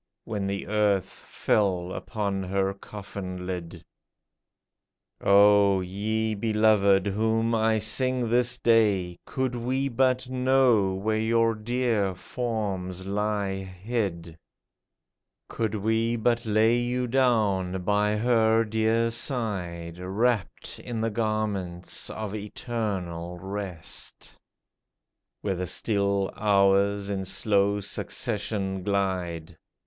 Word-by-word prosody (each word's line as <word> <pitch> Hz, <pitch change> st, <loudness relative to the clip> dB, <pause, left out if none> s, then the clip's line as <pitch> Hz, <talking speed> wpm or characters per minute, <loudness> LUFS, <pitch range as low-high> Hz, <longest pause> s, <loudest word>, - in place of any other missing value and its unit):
When 100 Hz, -3 st, -3 dB
the 100 Hz, 0 st, -3 dB
earth 105 Hz, -3 st, +1 dB
fell 95 Hz, -4 st, -1 dB
upon 100 Hz, -4 st, -3 dB
her 95 Hz, +1 st, 0 dB
coffin 95 Hz, -2 st, -7 dB
lid! 90 Hz, -2 st, -6 dB, 1.4 s
O, 100 Hz, -1 st, +6 dB
ye 110 Hz, +4 st, -2 dB
beloved 105 Hz, -2 st, +3 dB
whom 110 Hz, +3 st, +1 dB
I 110 Hz, 0 st, +2 dB
sing 125 Hz, +3 st, 0 dB
this 125 Hz, +1 st, +2 dB
day, 100 Hz, -8 st, +2 dB
Could 130 Hz, -2 st, -1 dB
we 130 Hz, +3 st, -1 dB
but 130 Hz, 0 st, +1 dB
know 125 Hz, -6 st, +3 dB
where 110 Hz, +3 st, -1 dB
your 115 Hz, +1 st, +2 dB
dear 110 Hz, -3 st, 0 dB
forms 95 Hz, -5 st, -4 dB
lie 100 Hz, -1 st, -1 dB
hid! 95 Hz, -3 st, -4 dB, 1.1 s
Could 110 Hz, -2 st, -2 dB
we 110 Hz, +3 st, +1 dB
but 120 Hz, +1 st, 0 dB
lay 110 Hz, +2 st, +4 dB
you 125 Hz, +1 st, -1 dB
down 105 Hz, -8 st, +1 dB
by 105 Hz, +2 st, +1 dB
her 115 Hz, -1 st, +3 dB
dear 110 Hz, +1 st, +1 dB
side, 95 Hz, -, -3 dB
Wrapped 100 Hz, +2 st, -1 dB
in 120 Hz, -2 st, -5 dB
the 115 Hz, 0 st, 0 dB
garments 105 Hz, -5 st, -2 dB
of 110 Hz, -2 st, -5 dB
eternal 100 Hz, -6 st, -4 dB
rest. 95 Hz, -3 st, -6 dB, 1.1 s
Where 100 Hz, -, -1 dB
the 90 Hz, 0 st, -3 dB
still 100 Hz, -2 st, +1 dB
hours 100 Hz, 0 st, +2 dB
in 95 Hz, -1 st, -2 dB
slow 100 Hz, +1 st, +2 dB
succession 100 Hz, -2 st, -2 dB
glide. 90 Hz, -4 st, -2 dB
105 Hz, 100 wpm, -26 LUFS, 95-115 Hz, 1.4 s, O